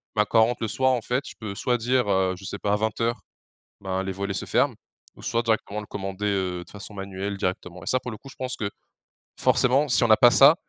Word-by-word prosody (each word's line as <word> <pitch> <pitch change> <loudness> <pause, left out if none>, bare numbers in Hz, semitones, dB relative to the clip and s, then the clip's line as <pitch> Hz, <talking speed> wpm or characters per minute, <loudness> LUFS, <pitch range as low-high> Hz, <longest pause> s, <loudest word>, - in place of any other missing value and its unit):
ben 105 - +4
quand 115 - +5
on - - +6
rentre 120 - -3
le 115 - 0
soir 130 +4 +2
en 125 -2 +1
fait. 125 +4 -1
Je - - -8
peux 105 -3 -5
soit 125 +3 +1
dire, 125 0 +1
heu, 95 -1 +2
je 95 - -11
sais 100 - -5
pas 105 0 +1
20:00, 110 +2 -1 0.6
ben 95 -1 -2
les 95 - -3
volets 100 +1 -3
se - - -3
ferment. - - +2 0.4
Ou - - -14
soit 115 - +1
directement 110 -2 -1
le 105 - -8
commander, 95 0 -4
heu, 95 -3 -1
de 90 - -20
façon 105 +1 -9
manuelle 100 0 -4
directement. 90 -1 -3
Et - - -12
ça 130 - +2
pour 125 -1 -6
le 110 - -7
coup 135 - -13
je - - -13
pense 130 0 -4
que, 100 - -3 0.7
forcement 135 +4 +3
si 125 - +3
on 115 - +2
a 110 - +8
pas 120 -1 +7
ça, 140 +4 +8
105 Hz, 260 wpm, -25 LUFS, 95-120 Hz, 0.7 s, a